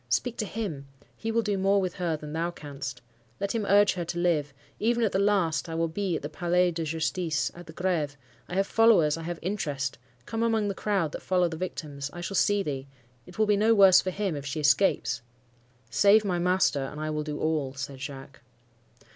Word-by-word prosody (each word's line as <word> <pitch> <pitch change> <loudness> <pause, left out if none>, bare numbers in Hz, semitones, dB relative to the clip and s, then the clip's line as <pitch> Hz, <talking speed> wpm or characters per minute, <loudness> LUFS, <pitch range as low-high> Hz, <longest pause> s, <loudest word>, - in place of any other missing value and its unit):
Speak 230 - 0
to 215 - -2
him; 180 -11 -5 0.3
he 225 - -3
will 230 0 +1
do 205 -2 -1
more 195 +1 +3
with 185 -3 -1
her 170 -4 -1
than 150 0 -8
thou 165 +2 -1
canst. 140 -6 -7 0.4
Let 200 0 -1
him 220 -3 -1
urge 205 +1 +5
her 180 - -3
to 170 - -4
live. 165 -5 +1 0.3
Even 235 +2 +1
at 215 - +2
the 190 - +1
last, 190 -5 +1
I 165 - -4
will 165 0 +1
be 180 +1 -2
at - - -4
the - - -2
Palais 175 +3 +1
de 165 0 -3
Justice,—at 160 +1 -2
the - - -9
Greve. 160 -5 -1 0.3
I 180 - -4
have 195 +1 +2
followers,—I 180 -10 +4
have 170 +1 -4
interest. 145 -9 -2 0.3
Come 225 - -3
among 225 -3 +1
the - - -1
crowd 195 -6 0
that - - -6
follow 180 -1 +2
the 165 - -5
victims,—I 155 -3 -5
shall 175 +2 -4
see 205 +1 +2
thee. 135 -4 -4 0.4
It 180 - -13
will 215 - +3
be 210 -1 +3
no 220 +2 +4
worse 195 -3 +7
for 185 - -2
him, 190 -2 -2
if 140 - -5
she 150 +3 -3
escapes'— 145 -4 +2 0.7
"'Save 200 - +5
my 180 -3 0
master, 180 -4 +2
and 140 +3 -6
I 155 0 -2
will 150 0 -2
do 150 -1 -5
all,' 150 -4 -1
said 135 0 -6
Jacques. 135 -1 -8
175 Hz, 215 wpm, -27 LUFS, 150-200 Hz, 0.7 s, worse